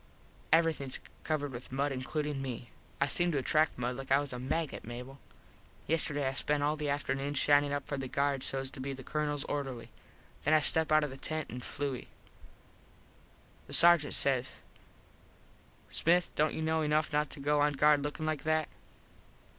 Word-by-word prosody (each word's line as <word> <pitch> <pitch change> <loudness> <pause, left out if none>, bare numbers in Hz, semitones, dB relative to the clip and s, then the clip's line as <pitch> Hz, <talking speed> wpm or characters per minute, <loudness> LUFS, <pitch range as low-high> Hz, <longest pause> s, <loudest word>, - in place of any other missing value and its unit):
Everythings 160 -5 +2 0.2
covered 145 -3 -2
with 125 0 -8
mud 140 +2 0
includin 140 +2 -3
me. 125 -3 -6 0.3
I 140 - +3
seem 175 +4 +2
to - - +1
attract 155 +4 +2
mud 125 0 -2
like 135 0 -8
I 135 - +6
was 145 -2 -4
a 125 - -5
maggot, 145 +4 -3
Mable. 125 +4 -8 0.7
Yesterday 145 -3 0
I 135 - -1
spent 145 +1 0
all 150 +1 +1
the 150 -1 -3
afternoon 140 0 -2
shinin 145 0 +4
up 145 -1 -2
for 145 - -4
guard 140 +1 -1
sos 135 0 -1
to - - -11
be 135 +1 -3
the 130 0 -9
Colonels 150 -1 -1
orderly. 135 -5 -4 0.5
Then 155 +2 +4
I - - +6
step 160 +1 +2
out 155 0 +5
of 150 - -3
the 135 - -8
tent 155 +3 -3
and 125 +1 -7
flui. 140 -3 -4 1.6
The - - -3
Sargent 170 -3 +7
says, 135 -2 +1 1.4
"Smith 175 +2 +2
dont 155 +1 +1
you 160 - -3
know 160 0 +1
enuff 150 0 +1
not 150 0 +1
to - - -8
go 145 +1 +1
on 145 0 +3
guard 150 +1 +4
lookin 145 +2 -4
like 155 -2 -1
that?" 155 0 0
145 Hz, 180 wpm, -31 LUFS, 135-155 Hz, 1.6 s, Sargent